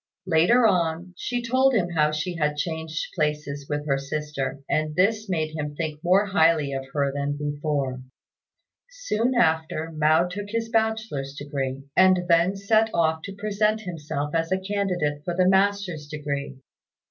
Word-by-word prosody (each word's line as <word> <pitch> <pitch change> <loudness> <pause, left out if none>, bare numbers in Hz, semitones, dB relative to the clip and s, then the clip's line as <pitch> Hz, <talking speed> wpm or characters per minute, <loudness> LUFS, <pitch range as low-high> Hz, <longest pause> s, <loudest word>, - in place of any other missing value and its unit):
Later 185 +8 +4
on, 175 -2 +1
she 245 +5 -3
told 260 +2 +3
him 180 -5 +1
how 155 -2 +3
she 155 +4 -2
had 150 -2 0
changed 160 0 -3
places 150 -3 -2
with 145 0 -2
her 135 -2 +1
sister, 140 -1 -4
and 155 0 -1
this 215 +3 +2
made 155 -3 -1
him 150 -1 -4
think 155 -1 -4
more 185 +4 +4
highly 160 -7 +3
of 135 0 -4
her 140 -2 +1
than 145 0 -2
before. 145 -3 -2 0.9
Soon 260 - -1
after 160 -5 +1
Mao 155 +2 +3
took 200 +3 -6
his 225 +1 -2
bachelor's 220 -12 -1
degree, 135 -2 -4
and 185 -1 +5
then 170 +3 +3
set 215 +3 +2
off 160 -1 +2
to 195 - -7
present 210 +1 0
himself 150 -6 -4
as 165 +1 0
a 190 - +3
candidate 190 -7 -1
for 175 +2 -3
the 180 0 +3
master's 190 -5 +1
degree. 145 -2 -4
160 Hz, 160 wpm, -25 LUFS, 150-200 Hz, 0.9 s, and